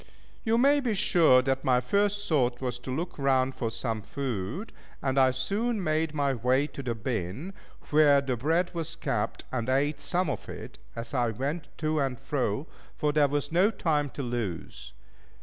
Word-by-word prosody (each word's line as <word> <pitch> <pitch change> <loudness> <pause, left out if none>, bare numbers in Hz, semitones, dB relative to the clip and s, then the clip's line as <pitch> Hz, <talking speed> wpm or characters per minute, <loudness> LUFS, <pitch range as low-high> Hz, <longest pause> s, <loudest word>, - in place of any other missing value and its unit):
You 225 +1 +2
may 280 +4 +5
be 240 -6 0
sure 170 -10 +5
that 135 0 0
my 125 -1 +4
first 205 +6 0
thought 125 -6 +2
was 125 -2 -3
to 125 - -9
look 165 +5 -4
round 135 -1 +2
for 115 - -2
some 115 -1 -3
food, 130 - -4 0.3
and 135 0 +1
I 130 -1 +6
soon 200 - -1
made 155 -1 0
my 140 -2 +1
way 130 +4 +2
to 145 - -7
the 120 -3 -2
bin, 110 - -3 0.4
where 145 -2 +6
the 135 -2 -1
bread 165 +9 +1
was 165 -3 -4
kept, 120 -7 -2
and 125 -1 -2
ate 145 +2 +1
some 180 +5 0
of - - -4
it - - -8 0.2
as 115 +3 -6
I 120 -3 +2
went 140 +9 -3
to 155 0 0
and 135 -3 -1
fro, 135 -2 -1 0.3
for 150 -1 0
there 150 -1 +4
was 145 +1 -2
no 180 +5 +4
time 155 -8 0
to 140 - -2
lose. 100 - -4
140 Hz, 185 wpm, -28 LUFS, 125-160 Hz, 0.4 s, I